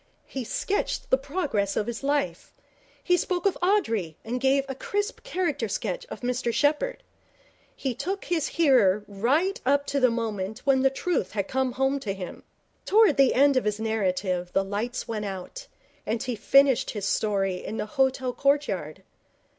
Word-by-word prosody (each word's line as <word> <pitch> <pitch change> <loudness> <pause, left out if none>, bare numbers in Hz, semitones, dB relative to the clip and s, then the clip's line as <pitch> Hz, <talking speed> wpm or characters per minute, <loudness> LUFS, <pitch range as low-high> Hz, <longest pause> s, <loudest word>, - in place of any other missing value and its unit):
He 265 - -5
sketched 395 - -2
the 260 - +6
progress 275 - -1
of 210 - +1
his 235 0 -5
life. 275 -12 -2 0.5
He 355 0 +3
spoke 355 0 -2
of 395 - +3
Audrey 230 - +1
and 245 +2 -3
gave 270 +1 +3
a 270 - -3
crisp 410 - -3
character 335 -10 -1
sketch - - -3
of - - -8
Mr 245 -1 -1
Sheppherd. 295 - 0 0.7
He 265 -3 -2
took 375 - -4
his 330 -4 0
hearer 245 - +4
right 275 - 0
up 280 +2 +2
to 280 - -1
the 255 -1 +5
moment 220 -3 -3
when 270 -2 +4
the 270 - +4
truth 335 +6 -2
had 200 -2 -1
come 260 -1 0
home 270 +2 +1
to 200 -7 -4
him. 185 -2 -7 0.4
Towards 420 -7 +5
the 275 -2 +4
end 280 0 +5
of 255 - +1
his 210 0 -1
narrative 185 -5 -1
the 195 - +2
lights 210 +5 -3
went 215 -2 -3
out, 200 - -7 0.4
and 225 +3 -2
he 250 -3 -2
finished 275 +4 +4
his 205 -3 -4
story 195 -3 0
in 220 - -5
the - - -2
hotel 260 +2 0
courtyard. 195 - 0
255 Hz, 170 wpm, -26 LUFS, 210-285 Hz, 0.7 s, the